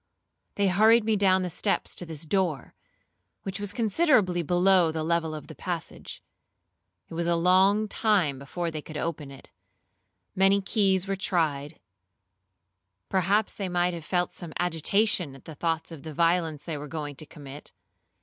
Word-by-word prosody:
They 200 -1 +2
hurried 220 +5 +5
me 220 -1 +2
down 190 -2 +3
the 180 - -2
steps 200 +4 0
to 175 - -5
this 160 -1 -7
door, 170 -6 -1 0.7
which 195 0 -4
was 205 -1 -3
considerably 215 - +2
below 175 0 +3
the 160 0 -3
level 165 -1 0
of 150 - -8
the - - -10
passage. 175 -3 -6 0.9
It - - -10
was 170 +1 -2
a 170 - +2
long 190 +5 +4
time 195 - +1
before 165 +5 -4
they 155 -1 -5
could 155 0 -8
open 155 -3 -4
it; 135 -1 -13 0.8
many 195 +1 +4
keys 195 -2 +1
were 195 - -1
tried; 155 -6 -1 1.3
perhaps 195 +3 +1
they 195 -3 -4
might 175 0 +1
have 170 -2 -6
felt 180 +2 -1
some 170 -3 -8
agitation 180 -1 +1
at 135 - -16
the 160 - -8
thoughts 165 +2 -2
of 160 -4 -9
the 155 -1 -8
violence 165 -2 +1
they 160 -4 -5
were 150 - -7
going 150 -1 -5
to 155 - -9
commit. 145 -1 -10
175 Hz, 165 wpm, -27 LUFS, 160-195 Hz, 1.3 s, hurried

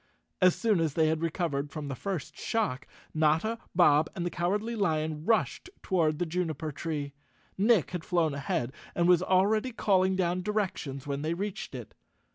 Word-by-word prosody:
As 185 -1 +6
soon 220 -6 +2
as 160 -4 0
they 160 -1 +3
had 160 0 0
recovered 155 -4 -1
from 145 0 -6
the 140 - -3
first 185 +1 -4
shock, 210 - -2 0.3
Notta, 160 +9 +2 0.2
Bob 155 -3 +5
and 175 - -3
the 175 - -2
Cowardly 205 +8 -1
Lion 155 -6 -1
rushed 230 - +1
toward 160 -5 +1
the 175 - 0
juniper 160 -3 -2
tree. 145 -2 -4 0.4
Nick 210 -2 +3
had 180 -3 -4
flown 165 -4 +1
ahead 135 -3 -2 0.2
and 170 0 +2
was 180 -1 +5
already 205 +7 +2
calling 190 -4 +2
down 180 -1 0
directions 180 -9 -2
when 140 0 -3
they 160 +2 -1
reached 195 -6 -5
it. 120 -4 -8
170 Hz, 170 wpm, -29 LUFS, 155-190 Hz, 0.4 s, As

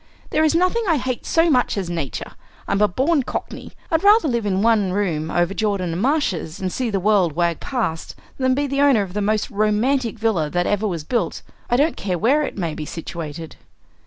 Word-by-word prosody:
There 310 - +2
is 315 +1 +3
nothing 365 +7 +2
I 325 - +3
hate 255 -2 -3
so 330 -1 +3
much 250 -5 +2
as 190 -3 -2
Nature! 165 -6 -4 0.4
I'm 200 - 0
a 210 - +5
born 275 - +1
cockney. 255 - -6 0.2
I'd 325 +1 +1
rather 410 -3 +6
live 235 -5 -1
in 195 0 0
one 220 -5 +3
room 165 -6 -1
over 175 +3 +1
Jordan 200 -5 -1
and 175 - -3
Marsh's, 225 - 0
and 185 -1 -3
see 255 -2 -1
the 200 -2 0
world 190 -4 +2
wag 170 +1 0
past, 220 - -3 0.2
than 260 -1 +2
be 285 +1 0
the 275 0 -1
owner 270 -7 +4
of 185 -2 -8
the 210 - -1
most 215 +1 0
romantic 225 +4 +1
villa 205 -9 0
that 175 +2 0
ever 205 +1 0
was 170 -6 -3
built, 205 -1 -2 0.3
I 240 - +2
don't 295 +5 +2
care 185 -3 -2
where 260 - +3
it 295 - -4
may 170 -5 -2
be 155 - -5
situated." 165 0 -7
210 Hz, 215 wpm, -21 LUFS, 175-260 Hz, 0.4 s, rather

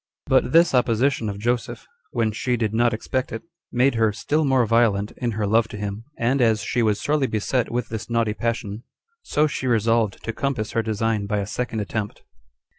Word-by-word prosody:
But - - +2
this 165 +1 +5
opposition 125 -1 +2
of 100 - -5
Joseph, 120 +3 -2 0.2
when 115 -2 0
she 125 +3 -1
did 110 -2 -1
not 120 +1 +3
expect 130 +3 -2
it, 115 - -5 0.3
made 130 +3 +3
her 110 -2 +2
still 150 +8 0
more 130 -4 +3
violent 110 -3 +2
in 120 -2 -2
her 105 0 -1
love 110 +2 +3
to 105 - -8
him; 105 +2 -5
and 125 +3 +1
as 110 -2 +3
she 120 - 0
was 105 -2 +2
sorely 145 -2 +1
beset 115 +3 -1
with 120 0 -2
this 110 0 -5
naughty 115 -2 +1
passion, 115 -2 -3 0.4
so 150 - +1
she 145 -3 -2
resolved 115 -2 +1
to 115 - -3
compass 125 -4 -2
her 115 - +1
design 110 -1 -1
by 105 0 0
a 100 - -1
second 115 +1 -3
attempt. 105 +1 -4
115 Hz, 195 wpm, -23 LUFS, 110-125 Hz, 0.4 s, this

